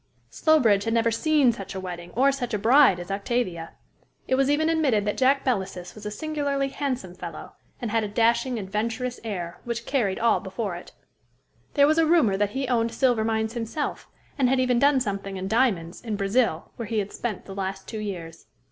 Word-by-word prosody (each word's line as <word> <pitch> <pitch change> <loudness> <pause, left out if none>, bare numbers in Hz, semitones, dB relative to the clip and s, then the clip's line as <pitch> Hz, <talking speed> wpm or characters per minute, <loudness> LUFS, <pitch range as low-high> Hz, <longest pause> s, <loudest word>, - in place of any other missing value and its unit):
Slowbridge 230 -11 +3
had 225 0 0
never 230 0 +2
seen 290 +1 +3
such 200 -4 -8
a - - -3
wedding, 175 -2 -7
or 270 +4 +4
such 245 -5 -3
a - - +1
bride 235 -2 +5
as 175 +2 -7
Octavia. 195 -5 -2 0.5
It - - 0
was 270 +1 +3
even 305 +2 +2
admitted 285 -11 +2
that 210 - -1
Jack 270 +1 +2
Belasys 190 -7 -2
was 210 -1 -8
a - - -2
singularly 280 +2 -2
handsome 260 -10 -3
fellow, - - -8 0.3
and 235 -4 -3
had 225 0 +1
a - - -2
dashing, 235 +4 +1
adventurous 225 +5 -3
air, 180 -6 -5
which 235 -1 -4
carried 220 -9 0
all 230 -1 +3
before 190 -1 -4
it. 175 - -10 0.8
There 285 -1 +6
was 310 +2 +3
a 325 - +4
rumor 305 - +4
that 205 +1 +1
he 270 -1 -1
owned 230 -2 +1
silver 245 -4 +2
mines 220 0 -1
himself, 240 +5 -4 0.3
and 255 -2 +4
had 265 0 +2
even 250 -2 +2
done 280 0 +4
something 200 -3 -3
in 185 0 -4
diamonds, 195 -7 +1
in 225 -3 -3
Brazil, 200 -3 0
where 230 - -5
he 225 - -2
had 205 -1 -2
spent 225 -5 -4
the 195 - -8
last 195 0 -4
two 220 - -5
years. 175 -6 -7
225 Hz, 200 wpm, -25 LUFS, 195-260 Hz, 0.8 s, There